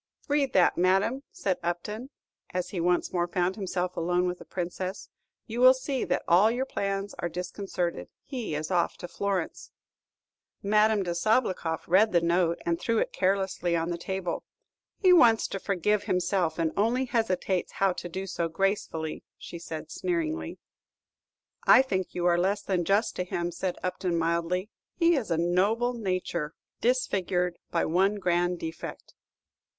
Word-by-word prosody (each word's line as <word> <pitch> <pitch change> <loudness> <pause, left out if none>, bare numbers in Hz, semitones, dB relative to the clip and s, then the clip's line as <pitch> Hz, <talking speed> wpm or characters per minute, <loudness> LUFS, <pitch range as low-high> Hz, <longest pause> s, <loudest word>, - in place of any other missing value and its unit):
"Read 285 -2 +1
that, 180 -2 +4
madame," 195 +8 +2
said 190 -2 -1
Upton, 210 +9 -4 0.5
as 180 - -1
he 185 - -4
once 175 +1 +1
more 175 -1 +1
found 180 +1 0
himself 180 -3 -2
alone 175 +2 +1
with 180 0 -2
the - - -11
Princess; 185 +1 -4 0.4
"you 235 +1 -4
will 255 +1 +8
see 260 0 -2
that - - 0
all 185 +6 +6
your 250 +3 -1
plans 200 -4 -3
are 175 - -1
disconcerted. 180 0 -4
He 245 - -4
is 155 +4 -3
off 175 -2 +1
to 175 - -7
Florence." 195 -2 -3 0.9
Madame 210 0 +3
de 175 -2 -2
Sabloukoff 180 -4 0
read 195 +5 +4
the 170 - +6
note, 170 0 +2
and 170 0 0
threw 230 - +1
it - - 0
carelessly 190 -2 0
on 165 +1 -1
the 170 - -2
table. 190 -1 -3 0.5
"He 370 -2 +5
wants 235 -10 +6
to 195 - -4
forgive 200 +2 0
himself, 180 -2 0
and 165 -2 +1
only 235 +6 +2
hesitates 200 -6 -1
how 195 -1 +2
to 175 - -6
do 190 +3 -4
so 170 -3 -2
gracefully," 165 -3 -2
said 165 -2 -7
she, - - -7
sneeringly. 165 - -2 1.1
"I 260 - +8
think 190 -8 -1
you 175 -1 -1
are 175 -1 +4
less 200 +3 +1
than 180 -4 0
just 205 +5 +2
to 180 - 0
him," 175 -1 -3
said 180 +1 -3
Upton, 185 -1 -1
mildly; 170 +4 0 0.2
"his 335 -8 +3
is - - -13
a 165 - +1
noble 200 +8 +2
nature, 185 -7 -2 0.2
disfigured 185 -8 0
by 170 - +1
one 190 +5 +2
grand 175 -2 +1
defect." 165 -1 -7
185 Hz, 160 wpm, -28 LUFS, 175-210 Hz, 1.1 s, will